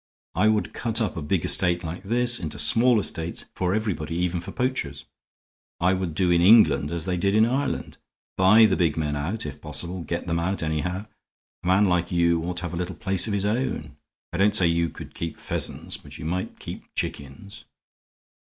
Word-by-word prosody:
I 105 - +3
would 110 -1 +1
cut 115 0 0
up 110 - -1
a 80 - -4
big 80 +4 0
estate 90 -2 +2
like 85 +2 -5
this 120 +4 +1
into 75 -3 -5
small 115 +9 +4
estates 85 -4 -3
for 90 +1 0
everybody, 90 -8 -2
even 90 0 0
for - - -7
poachers. 120 - -2 0.7
I 90 +2 +3
would 95 -4 -2
do 90 +1 +2
in 85 0 +4
England 90 -8 +6
as 85 -1 -1
they 90 -1 -1
did 100 +3 +1
in 110 +1 +6
Ireland 135 +4 -2 0.4
buy 105 +4 +7
the 100 -3 +3
big 80 -4 +1
men 75 -2 -1
out, 80 +9 -3
if 75 0 -7
possible; 85 +4 -5
get 85 +1 -4
them 85 -1 -1
out, 95 +2 -1
anyhow. 80 +6 -2 0.6
A - - -4
man 95 +3 +4
like 90 -2 +1
you 85 -1 +2
ought 90 0 -3
to - - -4
have 85 - -4
a - - -3
little 90 0 -3
place 95 -2 +1
of 105 - -2
his 100 0 0
own. 105 - -2 0.4
I 90 - -3
don't 105 +1 +4
say 95 - +3
you 85 0 +2
could - - -10
keep 85 -1 -5
pheasants, - - -3
but - - -12
you - - -8
might 90 +3 -3
keep - - -8
chickens." 70 - -6
90 Hz, 205 wpm, -25 LUFS, 85-105 Hz, 0.7 s, buy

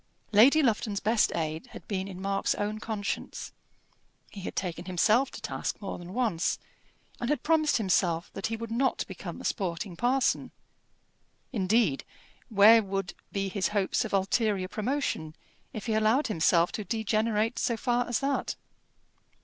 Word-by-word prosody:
Lady 260 +9 +6
Lufton's 215 -4 +1
best 220 +1 +2
aid 160 -1 -3
had - - -11
been 190 -2 -2
in 185 -2 -8
Mark's 195 +1 0
own 210 +1 -2
conscience. 210 -2 -4 0.8
He 200 - -8
had - - -6
taken 175 -2 -3
himself 215 +9 +3
to - - -10
task - - -3
more 200 - -5
than 175 +2 -9
once, 215 -9 +1 0.6
and 240 - -2
had 295 -4 0
promised 310 -1 +3
himself 180 -5 +1
that 195 - -3
he 225 - -2
would 230 0 -6
not 260 +3 +1
become - - -7
a - - -9
sporting 180 -2 -2
parson. 250 +7 +1 1.0
Indeed, 195 - +2 0.5
where 220 +1 +7
would 195 -2 -3 0.2
be 195 -1 -1
his 195 0 0
hopes 195 +4 +1
of 220 - -5
ulterior 195 0 +1
promotion, 215 - -2 0.4
if 215 - -6
he 225 - 0
allowed 220 +6 +3
himself 170 -3 +3
to 210 - -4
degenerate 220 +1 0
so 235 - 0
far 245 +2 0
as 240 - -1
that? 275 0 -1
210 Hz, 155 wpm, -28 LUFS, 190-230 Hz, 1.0 s, where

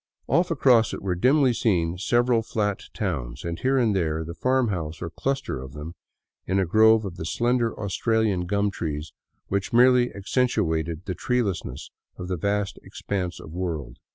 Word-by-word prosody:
Off 175 +1 +2
across 125 -8 +4
it - - -8
were 95 -2 0
dimly 130 - +3
seen 90 -7 +1
several 120 +5 +2
flat 105 -2 -2
towns, 70 - -4
and 85 0 -3
here 135 +1 +2
and 115 -5 +2
there 80 -4 0
a 80 +1 -6
farm 130 +7 +1
house 80 -5 -4
or - - -4
a - - -5
cluster 135 - -2
of 65 +1 -9
them 75 +2 -7 0.5
in 95 - +1
a 95 - +2
grove 110 +4 +5
of 90 -3 -6
the - - -5
slender 120 +6 0
Australian 105 -2 0
gum 100 +1 +1
trees 75 -4 -4 0.4
which 100 +4 -1
merely 125 0 +5
accen 125 +6 0
tuated 85 -5 -1
the 95 - -2
treelessness 115 -5 -2 0.3
of 90 - -6
the 90 - 0
vast 100 +3 -1
expanse 90 -3 -4
of 80 - -10
w^orld. 80 -9 -4
100 Hz, 180 wpm, -25 LUFS, 85-120 Hz, 0.5 s, grove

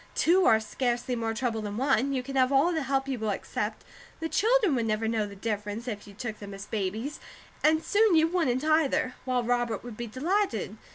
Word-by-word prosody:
Two 360 +3 +4
are 220 - +6
scarcely 245 +2 -2
more 225 -1 -2
trouble 225 -1 -1
than 205 0 -5
one; 265 0 +2
you 260 -2 -1
can 275 +1 -7
have 260 0 +3
all 285 +6 +4
the 320 - 0
help 270 0 0
you 265 -3 -2
will 220 -1 -1
accept; 200 - -3 0.4
the 325 - -2
children 440 - +3
would 235 -3 0
never 215 +1 0
know 220 -2 0
the 200 - -10
difference, 210 +2 -4
if 210 -4 -5
you 200 - -13
took 220 0 -5
them 200 -1 -8
as 195 +1 -8
babies, 220 +8 -3 0.4
and 315 +1 +4
soon 420 -3 +3
you 320 0 +5
wouldn't 300 -7 0
either; 310 -5 +2
while 250 -2 0
Robert 240 -3 0
would 240 -3 -8
be 240 - -4
delighted. 260 - -1
245 Hz, 215 wpm, -28 LUFS, 220-290 Hz, 0.4 s, are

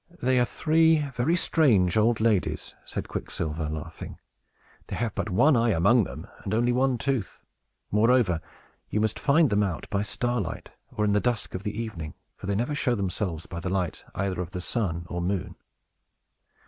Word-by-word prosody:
"They 130 0 +2
are 120 - +4
three 160 +3 +3
very 130 +8 +2
strange 115 - +3
old 110 +1 +3
ladies," 110 -4 0
said - - -5
Quicksilver, 80 -1 -3
laughing. 80 +1 -7 0.7
"They - - -4
have 115 -2 -2
but - - -3
one 135 +11 +4
eye 115 0 +3
among 105 +4 +4
them, - - -8 0.2
and 100 - -1
only 120 +2 +2
one 130 +1 +2
tooth. 120 -4 -2 0.5
Moreover, 105 -5 +3 0.5
you 105 - 0
must 110 -1 0
find 145 -2 +4
them 105 0 +3
out 95 -6 -2
by 100 - +1
starlight, 120 -2 -2 0.2
or 105 - 0
in 105 - +2
the 105 - +4
dusk 120 -1 -1
of 95 - -4
the 105 +1 -4
evening; 85 -10 -5 0.2
for - - -9
they 100 - 0
never 120 +8 0
show 140 -4 +1
themselves 90 -4 -2
by 85 - -6
the 90 - -3
light 90 -3 -2
either 95 -2 -1
of 85 - -5
the 90 -2 -5
sun 85 -5 -1
or 90 0 -3
moon." 90 0 -2
105 Hz, 180 wpm, -27 LUFS, 90-120 Hz, 0.7 s, are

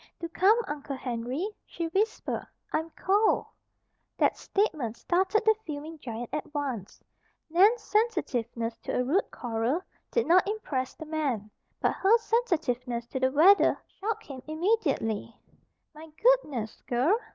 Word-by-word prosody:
"Do 335 - -4
come, 390 +6 +4
Uncle 290 -4 -4
Henry," 250 - -3 0.2
she 335 - -5
whispered. 405 +6 -1 0.3
"I'm 320 +1 0
cold." 410 +3 +3 0.7
That - - +3
statement 300 - -1
started 380 +5 +1
the 440 - +7
fuming 310 +1 -6
giant 235 -2 -6
at 300 - -3
once. 260 -9 -4 0.5
Nan's 420 +7 +5
sensitiveness 245 - 0
to - - -5
a - - +2
rude 325 +11 +1
quarrel 240 +8 -1 0.3
did 470 - +1
not 365 +3 +5
impress 270 -12 -3
the 315 - -8
man; 275 -10 -2 0.3
but - - +2
her 410 +5 +4
sensitiveness 255 - 0
to 260 - -3
the 260 0 +2
weather 345 +8 +6
shocked 430 +2 -4
him 270 -3 -8
immediately. 310 - 0 0.5
"My 310 +1 -11
goodness, 300 - +2
girl! 255 - +3
310 Hz, 135 wpm, -28 LUFS, 250-395 Hz, 0.7 s, the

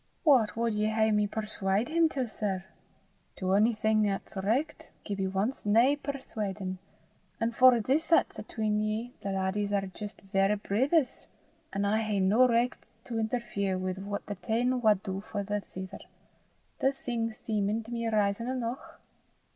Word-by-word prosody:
"What 260 -9 +4
wad 230 0 0
ye 210 0 +1
hae 220 0 +2
me 210 -1 +2
perswaud 210 0 -1
him 325 +1 +3
till, 265 -5 -2
sir? 195 -4 -3 0.7
To 185 0 -1
onything 215 0 +3
'at's 195 +1 -4
richt, 220 +10 -1 0.2
Gibbie 195 -2 -2
wants 205 +7 -1
nae 230 +7 +4
perswaudin'; 210 -10 -4 0.6
an' 230 0 +1
for 250 +1 +6
this 280 +9 +1
'at's 330 - +3
atween 215 -2 -1
ye, 215 +3 -2
the 200 - -3
laddies 195 +2 -1
are 200 -1 +1
jist 205 +2 -8
verra 195 +1 +1
brithers, 260 - +1 0.4
an' 200 +1 -1
I 210 +2 +2
hae 215 -2 0
no 210 +7 +5
richt 240 +1 +1 0.2
to 230 -2 -3
interfere 215 -4 -1
wi' 185 0 -2
what 200 +2 -5
the 205 - -4
tane 235 +6 0
wad 210 -4 +3
for 200 +2 -4
the 205 +1 -2
tither, 185 0 -7 0.8
the 270 - +3
thing 235 -4 -2
seemin' 215 0 -1
to 230 - -11
me 230 -1 -2
rizon 215 +1 +1
eneuch." 250 -1 -4
215 Hz, 155 wpm, -29 LUFS, 200-235 Hz, 0.8 s, for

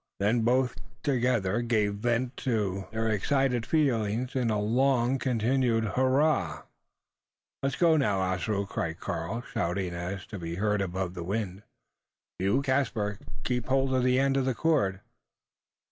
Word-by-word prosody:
Then 110 +4 +2
both 125 +2 +2 0.3
together 120 -6 +1
gave 110 -4 +1
vent 120 +4 -1
to 100 -6 -1
their 110 0 -1
excited 125 +3 +1
feelings 125 -5 +1
in 125 -3 +1
a 105 -1 +1
long 125 +3 +2
continued 120 -1 +1
hurrah! 130 - +2 1.0
"Let 135 -1 -1
go 165 -2 +4
now, 105 -9 +2
Ossaroo!" 95 +2 -1
cried 80 -4 -3
Karl, 90 +9 -3
shouting 95 -4 -1
so 85 - -5
as 90 +2 -4
to 105 - -8
be 85 0 -4
heard 105 +1 +1
above 95 -1 -2
the 90 -2 -5
wind. 100 0 -3 0.8
"You, 100 +9 +2
Caspar, 120 -7 0 0.2
keep 125 -2 -1
hold 135 0 +2
of 130 -1 +2
the 125 0 +3
end 135 0 +2
of 135 - +1
the 130 -2 0
cord." 110 -13 +1
115 Hz, 145 wpm, -28 LUFS, 100-130 Hz, 1.0 s, go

